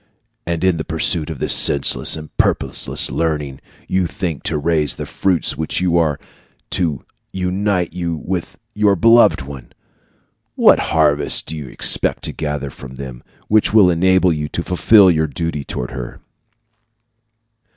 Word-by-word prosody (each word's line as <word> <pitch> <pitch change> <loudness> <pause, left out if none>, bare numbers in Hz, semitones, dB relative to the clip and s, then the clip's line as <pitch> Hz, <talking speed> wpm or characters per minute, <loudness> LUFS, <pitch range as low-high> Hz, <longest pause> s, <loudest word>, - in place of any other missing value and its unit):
And 85 0 -2
in 95 -3 +2
the 80 - -3
pursuit 80 -1 0
of 80 - -6
this - - +1
senseless 70 -1 +4
and 75 0 -11
purposeless - - -1
learning 75 -5 -3 0.3
you 95 -2 0
think 85 -4 -5
to 80 - 0
raise 75 -4 0
the - - -6
fruits 95 -4 -1
which 80 0 -3
are 85 -5 +1 0.5
to 80 -8 -1 0.3
unite 95 0 -1
you 85 -2 -3
with 85 +2 -5 0.2
your 105 -1 +2
beloved 115 - +4
one! 65 -3 -11 0.8
What - - +5
harvest 75 -2 +1
do 80 - -6
you 75 -3 -7
expect - - 0
to - - -3
gather 75 -2 -4
from 65 -1 -11
them 65 -2 -9 0.3
which 110 0 +2
will 95 -5 +6
enable 95 +1 +2
you 75 -1 -4
to 85 - -4
fulfil 95 +2 +4
your 80 -1 0
duty 75 +1 -4
toward 60 -2 -5
her? 60 -1 -8
80 Hz, 150 wpm, -18 LUFS, 75-90 Hz, 0.8 s, will